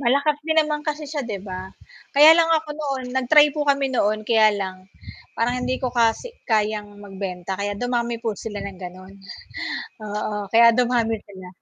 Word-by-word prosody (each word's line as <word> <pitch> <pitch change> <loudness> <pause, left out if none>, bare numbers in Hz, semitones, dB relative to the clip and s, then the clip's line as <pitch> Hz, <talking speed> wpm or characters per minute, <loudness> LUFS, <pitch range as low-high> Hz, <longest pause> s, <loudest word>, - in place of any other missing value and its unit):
Malakas 280 +4 +2
din 315 +1 -2
naman 300 -1 +2
kasi 300 0 -3
siya 295 0 -4
'di 215 -4 -4
ba? 185 0 -6 0.5
Kaya 300 +3 +10
lang 330 -1 +4
ako 320 -1 +1
noon 280 -4 -4
nag-try 290 +3 +5
po 300 - -4
kami 275 -1 +1
noon 215 -2 0
kaya 220 -1 +5
lang, 190 -1 -4 0.6
parang 245 +2 0
hindi 255 +1 -1
ko 255 - +1
kasi 235 - +1 0.2
kayang 215 -2 0 0.2
magbenta 190 -2 -6
kaya 205 0 -1
dumami 240 0 -1
po 225 - 0
sila 210 0 -6
ng 195 -2 -8
ganoon, 185 +2 -10 0.9
oo, 210 0 -3
kaya 230 +1 +7
dumami 240 -2 +1
sila. 190 -2 -11
235 Hz, 170 wpm, -22 LUFS, 205-280 Hz, 0.9 s, Kaya